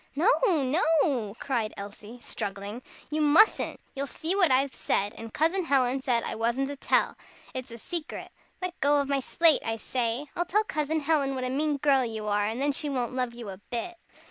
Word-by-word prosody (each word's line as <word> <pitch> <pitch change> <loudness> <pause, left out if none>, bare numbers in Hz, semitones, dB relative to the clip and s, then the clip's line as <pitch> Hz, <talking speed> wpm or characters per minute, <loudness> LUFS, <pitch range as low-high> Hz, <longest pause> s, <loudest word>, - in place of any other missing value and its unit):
"No, 350 +11 +4 0.2
no," 290 - +2
cried 235 -5 -2
Elsie, 205 +4 -9
struggling, 200 +3 -5 0.3
"you 310 +1 0
mustn't! 305 +9 +4 0.2
You'll 275 +1 -2
see 325 +7 +1
what 370 -5 +4
I've 265 +1 +2
said 205 +1 -1
and 225 0 -8
Cousin 335 - +1
Helen 265 -2 +2
said 245 -3 +1
I - - -3
wasn't 235 +5 0
to 285 - -4
tell. 275 - +1 0.4
It's 255 0 -5
a 230 - -9
secret. 330 +6 -5 0.3
Let 365 -1 -4
go 290 +1 +3
of 280 - -1
my 280 -1 +1
slate, 320 +4 +4
I 225 - -1
say! 235 +3 -2
I'll 350 - 0
tell 420 +4 +2
Cousin 310 -4 -1
Helen 285 -3 +1
what 255 - -3
a 255 - -2
mean 295 +2 0
girl 275 -2 +3
you 220 -3 -4
are, 205 0 +1
and 225 +3 -3
then 285 +1 +1
she 290 +1 -1
won't 255 -3 -2
love 250 -2 -2
you 235 -4 -7
a 190 - -7
bit." 290 +9 -4
270 Hz, 200 wpm, -27 LUFS, 235-305 Hz, 0.4 s, No